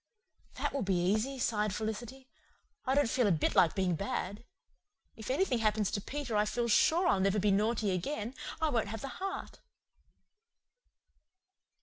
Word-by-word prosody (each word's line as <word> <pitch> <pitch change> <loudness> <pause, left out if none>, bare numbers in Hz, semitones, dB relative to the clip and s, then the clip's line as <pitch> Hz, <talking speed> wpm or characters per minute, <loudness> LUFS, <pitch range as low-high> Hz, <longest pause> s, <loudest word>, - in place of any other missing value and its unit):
"That - - -2
will 280 - -1
be 195 -2 +1
easy," 215 +9 0
sighed 210 -5 0
Felicity. 235 +5 -5 0.6
"I 265 - +2
don't 285 -3 +4
feel 240 0 +2
a - - +3
bit 160 -4 +1
like 170 - +4
being 185 -2 +1
bad. 200 +2 -3 0.7
If 220 +1 -8
anything 265 -2 +1
happens 215 -2 +1
to 200 - -2
Peter 270 -1 -4
I 210 - +4
feel 235 +2 -1
sure 330 - +4
I'll 200 - +3
never 195 +2 +2
be 205 0 +2
naughty 210 +1 +1
again. 215 +5 -3 0.3
I 320 - +1
won't 230 -5 0
have 220 +1 -5
the 275 - -5
heart." 390 0 -5
220 Hz, 160 wpm, -32 LUFS, 200-260 Hz, 0.7 s, don't